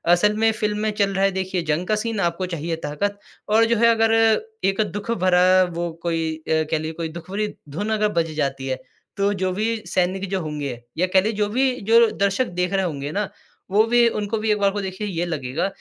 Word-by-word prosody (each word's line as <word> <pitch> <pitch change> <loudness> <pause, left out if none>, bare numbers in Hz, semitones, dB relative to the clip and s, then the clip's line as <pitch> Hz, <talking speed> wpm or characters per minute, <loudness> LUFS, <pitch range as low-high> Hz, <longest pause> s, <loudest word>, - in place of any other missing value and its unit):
असल 210 +4 +2
में 225 0 +3
फ़िल्म 210 -1 -1
में 215 0 0
चल 200 -2 0
रहा 195 0 0
है 195 - +2
देखिए 190 -1 -2
जंग 170 +4 -1
का 215 - +2
सीन, 220 -1 -2
आपको 175 +1 0
चाहिए 170 -1 -3
ताकत 200 +8 -2 0.3
और 225 +2 +5
जो 230 +1 +2
है 235 +1 +5
अगर, 225 0 +3 0.5
एक 195 +2 +2
दुःख 205 +3 -4
भरा 185 -2 +4
वो 170 0 -2
कोई 165 -2 -1
अ, - - -20 0.3
कह 160 - +2
लीजिए 155 +1 -4
कोई 165 0 -4
दुःख 170 - -16
भरी 210 +1 -2 0.2
धुन 205 +10 -3
अगर 210 0 +2
बज 165 - -5
जाती 135 -3 -2
है, 130 -1 -2 0.4
तो 200 +1 +2
जो 185 -1 -1
भी 220 +4 0
सैनिक 185 +2 0
जो 190 -1 -1
होंगे 145 -6 -4 0.2
या 185 +3 +2
कह 190 - +6
लीजिए 215 +1 -2
जो 210 - +1
भी 260 +1 +3 0.2
जो 230 -1 +7
दर्शक 200 +5 +1
देख 180 +2 0
रहे 195 -1 +1
होंगे 145 -3 -4
ना, 205 +3 -2 0.4
वो 210 +2 +5
भी 240 0 +5
उनको 210 0 -2
भी 215 +1 -2
एक 210 - +1
बार 200 -1 +3
को 205 - -3
देखिए 190 +2 -4
ये 175 -2 -2
लगेगा 150 -1 -2
195 Hz, 230 wpm, -22 LUFS, 170-210 Hz, 0.5 s, जो